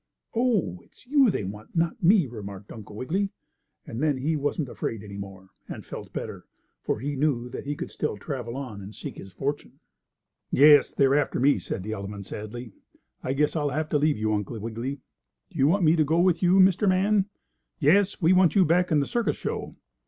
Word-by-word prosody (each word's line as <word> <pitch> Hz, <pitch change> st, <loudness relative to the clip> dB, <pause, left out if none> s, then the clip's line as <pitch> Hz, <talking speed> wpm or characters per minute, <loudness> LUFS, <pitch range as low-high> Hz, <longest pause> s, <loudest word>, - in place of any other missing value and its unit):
"Oh, 220 Hz, -, +1 dB
it's -, -, -20 dB
you 270 Hz, -1 st, +4 dB
they 185 Hz, -, -1 dB
want, 105 Hz, +3 st, -7 dB
and 165 Hz, -, +1 dB
not 165 Hz, -1 st, -2 dB
me," 185 Hz, 0 st, +5 dB
remarked 105 Hz, -5 st, -9 dB
Uncle 110 Hz, -2 st, -10 dB
Wiggily, 185 Hz, -, -1 dB, 0.6 s
and 115 Hz, -, -6 dB
then 150 Hz, -3 st, +2 dB
he 150 Hz, +5 st, 0 dB
wasn't 145 Hz, 0 st, -1 dB
afraid 115 Hz, -3 st, -4 dB
any 100 Hz, -1 st, -9 dB
more, 95 Hz, -1 st, -9 dB, 0.2 s
and -, -, -7 dB
felt -, -, -8 dB
better, -, -, -6 dB, 0.3 s
for -, -, -2 dB
he 145 Hz, +2 st, -3 dB
knew 130 Hz, -4 st, 0 dB
that 130 Hz, -, -7 dB
he 145 Hz, -, -1 dB
could -, -, -6 dB
still -, -, -3 dB
travel 120 Hz, +1 st, -5 dB
on 125 Hz, -8 st, -6 dB
and 100 Hz, +2 st, -10 dB
seek -, -, -7 dB
his 95 Hz, -, -10 dB
fortune. 140 Hz, +10 st, -4 dB, 0.7 s
"Yes, 145 Hz, 0 st, +6 dB
they're 135 Hz, -1 st, +3 dB
after 145 Hz, -1 st, +1 dB
me," 140 Hz, +3 st, +4 dB
said 95 Hz, -, -5 dB
the 110 Hz, -, -5 dB
elephant 100 Hz, -1 st, -6 dB
sadly. 110 Hz, +4 st, -7 dB, 0.5 s
"I 130 Hz, -, -2 dB
guess 150 Hz, +3 st, +1 dB
I'll 145 Hz, -2 st, 0 dB
have 155 Hz, +2 st, -2 dB
to 150 Hz, -, +2 dB
leave 150 Hz, -2 st, +2 dB
you, 110 Hz, 0 st, 0 dB
Uncle 105 Hz, +2 st, -3 dB
Wiggily. 115 Hz, +5 st, -5 dB, 0.5 s
Do -, -, -9 dB
you 135 Hz, -, +5 dB
want 185 Hz, +4 st, +2 dB
me 160 Hz, 0 st, +5 dB
to 160 Hz, -, +3 dB
go 160 Hz, +3 st, +1 dB
with 175 Hz, -1 st, +3 dB
you, 180 Hz, 0 st, +4 dB
Mr. 190 Hz, +2 st, +5 dB
Man?" 195 Hz, +2 st, +2 dB, 0.5 s
"Yes, 190 Hz, +6 st, +3 dB
we 175 Hz, 0 st, +4 dB
want 185 Hz, -1 st, +4 dB
you 190 Hz, -2 st, +6 dB
back 180 Hz, +3 st, +2 dB
in 150 Hz, -2 st, +4 dB
the -, -, 0 dB
circus 235 Hz, +4 st, -1 dB
show." -, -, -4 dB
145 Hz, 210 wpm, -26 LUFS, 110-170 Hz, 0.7 s, Yes